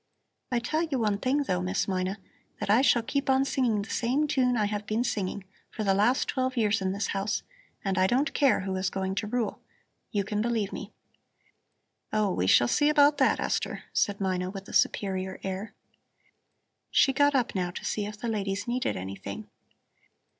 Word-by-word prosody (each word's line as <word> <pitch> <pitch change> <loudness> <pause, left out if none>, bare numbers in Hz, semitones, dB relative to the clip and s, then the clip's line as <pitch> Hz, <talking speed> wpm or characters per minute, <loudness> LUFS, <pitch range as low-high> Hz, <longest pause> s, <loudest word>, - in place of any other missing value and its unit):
I 245 - +2
tell 275 +7 0
you 315 -5 -1
one 210 -4 0
thing, 275 +5 +1
though, 90 - -1
Miss 90 +1 -1
Mina, 185 +1 -1 0.4
that - - 0
I 225 +4 +6
shall 240 -4 +4
keep 280 +3 -2
on 265 +1 +4
singing 240 -7 +1
the 215 - -9
same 260 +6 +1
tune 255 -4 +2
I 210 - +2
have 205 0 -3
been 220 +3 0
singing 200 -4 -2 0.3
for 220 - -4
the 195 -2 +3
last 215 +7 +2
twelve 260 -1 -1
years 215 -2 +2
in 190 0 0
this 200 +1 -2
house, 195 +1 -1 0.4
and 190 -1 0
I 185 - +4
don't 265 +8 +1
care 275 -7 +3
who 190 0 -3
is 185 0 0
going 190 0 -2
to 210 +2 -2
rule. 235 0 -2 0.5
You 205 -3 0
can 210 +2 -2
believe 225 -3 -1
me." 205 - -7 1.2
"Oh, 210 -2 +1
we 90 - 0
shall 120 +5 +5
see 290 - +3
about 295 -1 +5
that, 265 - +3
Esther," - - -2
said 200 -1 +1
Mina 185 -2 -1
with 195 +1 -8
a - - -10
superior 190 -1 0
air. 195 +3 -5 1.1
She 270 - +4
got 285 +1 +3
up, 250 -3 +1
now, 180 -2 -1
to 175 - -7
see 205 -1 -1
if 210 0 -8
the 235 - -4
ladies 205 -2 -2
needed 250 +2 -1
anything. 95 +1 -7
210 Hz, 195 wpm, -28 LUFS, 195-255 Hz, 1.2 s, I